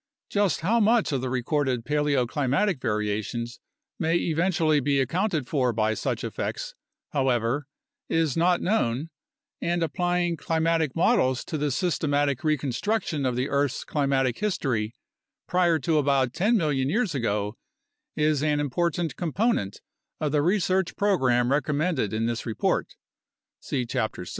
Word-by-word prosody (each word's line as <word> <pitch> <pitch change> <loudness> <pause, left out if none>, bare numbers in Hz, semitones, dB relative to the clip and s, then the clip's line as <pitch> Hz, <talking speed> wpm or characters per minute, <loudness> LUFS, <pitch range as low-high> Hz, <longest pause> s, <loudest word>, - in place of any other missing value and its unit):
Just 200 -4 +1
how 220 +8 +2
much 225 -1 +3
of 135 -3 0
the 130 - -2
recorded 130 -1 -1
paleoclimatic 145 - +1
variations 110 +3 -2 0.4
may 165 +1 +1
eventually 165 -2 +2
be 140 0 +1
accounted 160 - 0
for 130 -5 +1
by 110 0 +1
such - - -2
effects, - - -4 0.4
however, 130 0 0 0.4
is 165 -4 +1
not 175 +1 +3
known, 160 - 0 0.5
and 175 0 0
applying 175 +1 0
climatic 160 -3 0
models 165 - +2
to - - -5
the 150 -1 0
systematic 145 -3 0
reconstruc 155 - 0
tion 145 -4 -1
of 125 - -1
the 125 +2 0
earth's 140 -2 0
climatic 135 -4 0
history 125 - -1 0.5
prior 175 -2 +3
to 155 +2 +1
about 135 -3 +2
10 215 - +2
million 140 -7 0
years 210 -1 0
ago 105 -4 -1 0.6
is 150 -2 +2
an 150 -1 +1
important 165 +2 -1
component 175 - -1 0.4
of 150 -2 -1
the 150 0 +2
research 185 +1 +1
program 130 - +2
recommended 145 - 0
in 110 +1 -1
this 115 0 -2
report 110 - -1 0.6
(see 130 -3 -2
Chapter 110 -6 -2
6). - - -8
145 Hz, 140 wpm, -26 LUFS, 130-170 Hz, 0.6 s, much